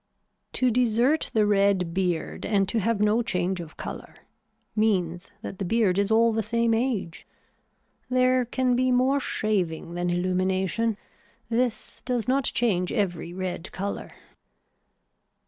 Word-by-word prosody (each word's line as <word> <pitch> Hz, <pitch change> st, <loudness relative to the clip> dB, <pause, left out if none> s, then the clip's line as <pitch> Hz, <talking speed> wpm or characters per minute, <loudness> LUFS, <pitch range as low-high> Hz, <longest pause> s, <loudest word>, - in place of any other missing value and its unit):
To 255 Hz, -1 st, +2 dB
desert 245 Hz, +5 st, +2 dB
the 215 Hz, -1 st, +4 dB
red 200 Hz, -4 st, +2 dB
beard 180 Hz, -3 st, -1 dB
and 200 Hz, -2 st, +1 dB
to 230 Hz, -, +1 dB
have 220 Hz, 0 st, 0 dB
no 210 Hz, +3 st, +3 dB
change 180 Hz, -4 st, -1 dB
of 160 Hz, -2 st, -11 dB
color -, -, -7 dB, 0.6 s
means 185 Hz, -4 st, 0 dB
that 190 Hz, -, -7 dB
the -, -, -1 dB
beard 200 Hz, -2 st, +2 dB
is 200 Hz, 0 st, +1 dB
all 225 Hz, +1 st, +4 dB
the 225 Hz, -, +1 dB
same 230 Hz, +2 st, +1 dB
age. 225 Hz, -8 st, -2 dB, 0.8 s
There 255 Hz, 0 st, +3 dB
can 250 Hz, +1 st, +1 dB
be 255 Hz, +1 st, +2 dB
more 260 Hz, +3 st, +3 dB
shaving 180 Hz, -, -1 dB
than 175 Hz, 0 st, -1 dB
illumination. 185 Hz, +4 st, 0 dB, 0.5 s
This 235 Hz, 0 st, -1 dB
does 245 Hz, -4 st, -2 dB
not 270 Hz, +1 st, +2 dB
change 185 Hz, -7 st, +1 dB
every 175 Hz, -4 st, -1 dB
red 185 Hz, -1 st, -5 dB
color. 200 Hz, +2 st, -4 dB
210 Hz, 135 wpm, -26 LUFS, 185-235 Hz, 0.8 s, the